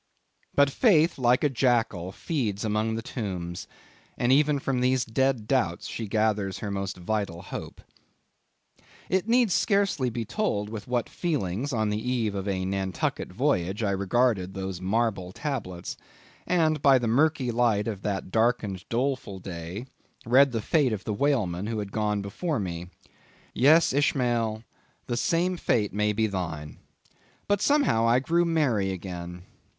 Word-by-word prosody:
But 140 -1 +4
Faith, 165 - +3
like 125 0 +3
a - - +5
jackal, 115 -8 +1
feeds 110 - -2
among 110 +1 0
the 115 - -4
tombs, 90 -8 -5 0.5
and 120 +1 +2
even 145 +1 +4
from 135 -2 -1
these 130 -1 +2
dead 125 -1 0
doubts 100 -11 0
she 110 - -5
gathers 105 -2 0
her 100 - -4
most 100 -1 -3
vital 95 -1 -3
hope. - - -7 1.3
It 190 +2 +1
needs 235 -5 +4
scarcely 200 - +2
to - - -2
be 115 0 -3
told, 105 - -1
with 110 -2 -7
what 125 -1 0
feelings, 135 - -2
on 110 -4 0
the 105 +1 -2
eve 120 -4 -1
of 100 0 -4
a 95 -2 -1
Nantucket 95 -2 -2
voyage, 95 +5 0
I 100 - +1
regarded 100 -1 +1
those 95 -2 -4
marble 100 -2 0
tablets, 95 - -5 0.5
and 160 -4 +2
by 135 -2 +6
the 120 - -2
murky 135 +1 +2
light 115 -3 +2
of 105 -4 -4
that 100 -3 -3
darkened, 110 -4 0
doleful 125 -4 -1
day 90 +4 -7 0.4
read 135 +4 +5
the 115 -3 -2
fate 140 -5 +2
of 105 -1 -4
the 105 - -2
whalemen 105 -7 0
who 115 0 -2
had 100 -2 -4
gone 105 -1 -1
before 145 - -2
me. 90 -3 -4 0.7
Yes, 155 +5 +5
Ishmael, 120 -6 +1 0.4
the 120 - -2
same 175 +8 +1
fate 105 -10 0
may 105 +1 +1
be 110 +1 +1
thine. 85 -7 -4 0.7
But 205 -1 +1
somehow 280 - +3
I 120 +1 +5
grew 170 +6 +2
merry 135 - +1
again. 90 -1 -7
110 Hz, 155 wpm, -27 LUFS, 100-135 Hz, 1.3 s, by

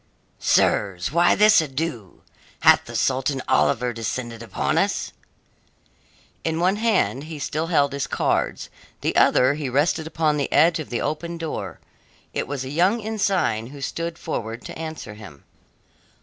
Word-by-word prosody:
"Sirs, 95 +1 +1
why 170 +3 +4
this 210 -3 +6
ado? 135 - -5 0.4
Hath - - +6
the - - -9
Sultan 130 +1 0
Oliver 115 +12 +2
descended 115 +1 -4
upon 115 - -1
us?" - - -1 1.3
In 160 0 -1
one 185 +4 +2
hand 210 - +1
he 160 -1 -7
still 155 +3 -2
held 140 -4 +2
his 140 -2 -2
cards, - - -1 0.3
the - - -1
other 130 +2 +4
he 145 -3 -4
rested 155 +4 +1
upon 155 -2 0
the 140 - -2
edge 165 +3 +4
of 155 - -6
the 120 - -2
open 170 +2 -3
door. 165 -1 -5 0.5
It - - -2
was 135 -1 -4
a - - -6
young 180 - +2
ensign 195 - 0
who 140 +2 -11
stood 165 +4 -4
forward 115 -8 -5
to - - -7
answer 160 -8 -6
him. 95 -10 -13
145 Hz, 150 wpm, -23 LUFS, 125-165 Hz, 1.3 s, this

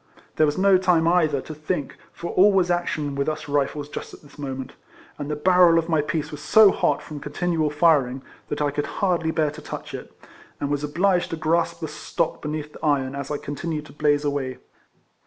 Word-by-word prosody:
There 155 - +5
was 145 - -1
no 190 0 +5
time 175 -3 +3
either 160 -5 +2
to 155 - -8
think, 150 -1 -3 0.2
for 170 - -6
all 200 +3 +5
was 185 -2 +2
action 155 -4 -1
with 140 +2 -1
us 155 0 -5
Rifles 145 0 -1
just - - -7
at - - -18
this 145 - -17
mo 135 -2 -4
ment; 130 -1 -7 0.5
and 145 0 -4
the 150 - -1
barrel 180 +1 +5
of 165 +1 0
my 160 -2 +3
piece 150 +1 -3
was 150 -1 -8
so 210 +6 +6
hot 145 - 0
from 150 -1 -8
continual 155 +1 -1
firing, 145 -4 +2 0.3
that 145 0 -1
I 145 - +1
could 145 +1 -2
hardly 175 -4 +1
bear 155 -2 +1
to 155 +1 -10
touch - - -7
it, - - -7 0.5
and 145 0 -2
was 145 0 -1
obliged 175 +5 +1
to - - -3
grasp 165 +1 0
the 160 - -2
stock 155 +2 -3
beneath 150 0 -5
the - - -13
iron, 135 -3 +1
as 140 0 -5
I 150 - -1
con 145 - -6
tinued 155 -1 -4
to - - -14
blaze 145 0 +1
away. 140 -3 -2
150 Hz, 220 wpm, -24 LUFS, 145-170 Hz, 0.5 s, so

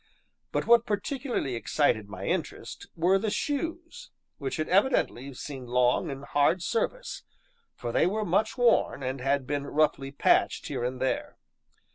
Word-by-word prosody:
But - - -1
what 235 0 +5
particularly 235 - -2
excited 115 -3 +1
my - - -7
interest - - -3
were 180 +4 +3
the 215 +2 -1
shoes, 335 - -3 0.3
which 135 -3 -3
had 155 - -1
evidently 185 - +2
seen 130 -2 -7
long 125 0 +2
and 135 0 -6
hard 145 +6 +2
service, - - -2 0.5
for 120 - -4
they - - +3
were 210 +3 -1
much 200 +7 +1
worn, 235 - +3
and 130 0 -3
had 135 0 +1
been 145 +1 -2
roughly 145 -3 +1
patched 140 - +2
here - - -3
and 125 +1 -2
there. 130 - -2
155 Hz, 150 wpm, -28 LUFS, -, 0.5 s, what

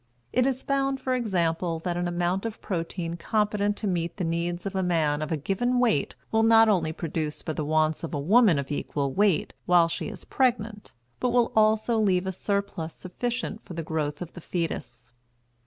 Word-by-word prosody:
It 250 +1 +3
is 265 -1 -1
found, 275 -1 0
for 260 - -1
example, 175 -7 0
that 175 +1 -2
an 175 0 -1
amount 175 +2 0
of 225 - -8
protein 170 -1 -3
competent 205 +2 0
to 215 - -3
meet 170 -2 -1
the 190 - -2
needs 170 +2 -2
of 195 0 -4
a 190 - +1
man 160 -5 +1
of 155 - -3
a 160 - +1
given 220 - 0
weight 230 - +2 0.2
will 220 - +3
not 225 0 +6
only 175 -7 +2
provide 160 -2 -3
for 155 - -5
the 155 - -3
wants 155 +1 +1
of 165 - -4
a - - -1
woman 200 +3 +5
of 140 +1 -3
equal 140 -1 -2
weight 200 -4 +2
while 175 -2 +6
she 165 - -4
is - - -9
pregnant, 225 -5 0 0.3
but 250 - +1
will 240 -1 +2
also 220 +1 +3
leave 190 -3 +2
a 190 - -1
surplus 190 -4 -2
sufficient 230 +5 -4
for 180 - -9
the 165 - -3
growth 155 0 -2
of 170 - -11
the 175 - -9
fetus. 125 -9 -4
180 Hz, 200 wpm, -26 LUFS, 165-220 Hz, 0.3 s, not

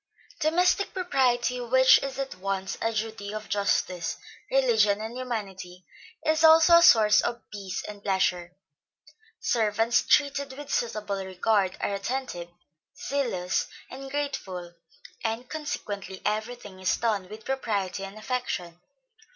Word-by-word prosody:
Domestic 360 +6 +2
propriety, 255 -9 +1
which 260 +2 +6
is 275 -1 -5
at 275 0 -3
once 195 +1 -3
a 225 - +1
duty 220 -2 -4
of 215 0 -6
justice, 185 -3 0 0.3
religion 475 - +3
and 220 +2 -6
humanity, 195 -8 -6 0.4
is 315 +1 +2
also 325 +1 +8
a - - +6
source 215 -9 +7
of 235 0 -2
peace 200 -3 -5
and 210 -1 -8
pleasure. 180 -3 0 0.9
Servants 225 0 +2
treated 280 -2 +2
with 290 -1 -6
suitable 210 -4 -2
regard, 190 +1 0
are - - -1
attentive, 200 -4 -4 0.5
zealous 235 -12 -1 0.2
and 270 +1 -8
grateful, 195 -12 -4 0.5
and 225 +2 -2
consequently 205 -11 -5
every 220 +3 -1
thing 205 -6 -12
is 185 0 +1
done 205 -5 -1
with 215 +1 -10
propriety 205 -8 -2
and 195 +2 -8
affection. 215 -8 -3
220 Hz, 125 wpm, -27 LUFS, 195-265 Hz, 0.9 s, also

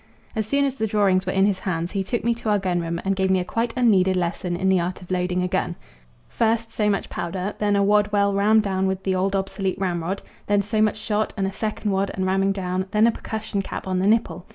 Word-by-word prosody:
As 220 -1 -1
soon 280 +3 +2
as 275 - 0
the 220 -4 -2
drawings 195 -3 +2
were - - +1
in 195 +1 +3
his 200 -2 +1
hand 170 -2 -2
he 195 -1 -1
took 215 +5 -2
me 235 +1 +2
to 230 -1 -4
our 210 - +4
gun 185 -3 0
room 170 0 -3
and 195 0 +1
gave 190 0 +1
me 190 0 +3
a 180 - -2
quite 230 +4 -1
unneeded 190 -6 +4
lesson 175 0 -2
in 190 +2 -1
the 190 -1 +4
art 175 +2 -3
of 180 - -12
loading 180 0 0
a - - 0
gun - - -1 0.5
first 230 0 0
so 210 -1 +1
much 200 - 0
powder, 185 +3 -4
then 205 -1 +2
a 200 - +3
wad 210 +1 +3
well 200 -1 +2
rammed 210 +2 +4
down 190 -1 0
with 190 0 -2
the 190 - 0
old 190 +2 0
obsolete 195 0 -2
ramrod; 180 0 -2 0.2
then 205 0 +2
so 215 +2 0
much 215 0 +2
shot 215 0 -1
and 195 - 0
a 195 - -1
second 215 0 -2
wad 195 +1 0
and 190 - -1
ramming 195 +1 +2
down; 185 -1 -2
then 210 +2 +3
a 235 - +5
percussion 220 -2 -4
cap - - -6
on 185 -1 0
the 190 - +1
nipple. 215 -4 +1
195 Hz, 260 wpm, -23 LUFS, 185-210 Hz, 0.5 s, a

